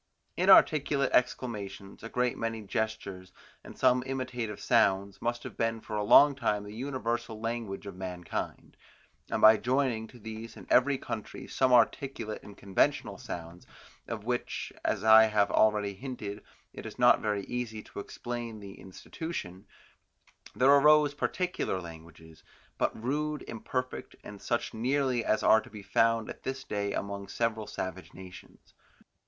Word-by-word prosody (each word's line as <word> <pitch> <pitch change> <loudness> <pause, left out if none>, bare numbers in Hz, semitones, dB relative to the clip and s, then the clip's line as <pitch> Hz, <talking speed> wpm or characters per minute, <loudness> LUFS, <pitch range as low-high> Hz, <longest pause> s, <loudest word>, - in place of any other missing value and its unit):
Inarticulate 145 -2 +5
exclamations, 105 -6 -1
a 115 - -7
great 125 0 0
many 115 -1 -3
gestures, 100 -3 -4 0.3
and - - -12
some 125 0 +4
imitative 125 -5 -4
sounds, 100 -4 +2
must 120 0 -2
have - - -8
been 115 0 -1
for 110 - -7
a 105 - 0
long 145 +7 +7
time 105 -6 -1
the 105 0 -9
universal 120 -3 -3
language 115 -3 -4
of 100 - -7
mankind, 90 -2 -6 0.5
and - - -2
by 110 0 +9
joining 125 -2 0
to 125 - -15
these 110 0 -8
in - - -11
every 135 +2 +4
country 110 -4 -6
some 130 -1 +1
articulate 120 -2 +1
and 100 - -13
conventional 95 -1 0
sounds, 85 +1 -8 0.4
of 110 -3 -5
which, 120 +2 -3
as - - -1
I 110 0 +8
have 105 -2 +2
already 105 -2 +3
hinted, 105 -2 -6 0.3
it - - -8
is - - -10
not - - +5
very 105 -2 -1
easy 115 -1 -4
to - - -9
explain 120 +1 -6
the 100 -1 -11
institution, 95 - -7 0.9
there 130 +2 +5
arose 150 +1 +6
particular 180 - -2
languages, 80 -1 -12 0.4
but - - 0
rude, 150 +3 -1
imperfect, 125 +3 -4
and 100 -1 -10
such 120 0 -2
nearly 125 +1 0
as 110 - +1
are 110 - +6
to 120 - -14
be 105 -2 -10
found 115 +1 +2
at - - -8
this 130 0 -4
day 100 -3 -2
among 100 0 -4
several 110 +1 -2
savage 95 -3 -6
nations. 95 -1 -13
110 Hz, 150 wpm, -29 LUFS, 100-125 Hz, 0.9 s, by